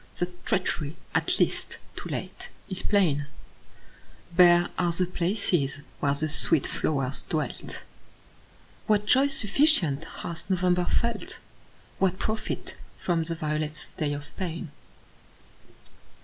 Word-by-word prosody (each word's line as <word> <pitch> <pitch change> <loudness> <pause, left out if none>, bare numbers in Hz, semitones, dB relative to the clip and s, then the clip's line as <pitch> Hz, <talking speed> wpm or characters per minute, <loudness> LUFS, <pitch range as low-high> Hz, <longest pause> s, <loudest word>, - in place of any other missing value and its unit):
The 175 0 -1
treachery, 165 -5 0 0.2
at - - +1
last, - - +1 0.2
too - - -6
late, - - -5 0.2
is 190 -1 -2
plain; 160 -9 +2 1.1
Bare 175 -1 +7
are 175 -2 +1
the 180 +2 +2
places 175 -6 0 0.2
where 140 -1 +2
the 155 +2 0
sweet 155 0 +2
flowers 135 -3 0
dwelt. 155 -5 -3 1.0
What 210 -1 +3
joy 265 +5 +5
sufficient 210 - +3
hath 170 +2 -6
November 180 -1 +2
felt? 235 +2 -1 0.6
What 190 -1 +2
profit 215 +2 -3 0.2
from 170 -2 0
the 165 0 -1
violet's 150 -1 -2
day 150 -2 -2
of 145 0 -8
pain? 170 -3 -4
175 Hz, 115 wpm, -27 LUFS, 150-190 Hz, 1.1 s, Bare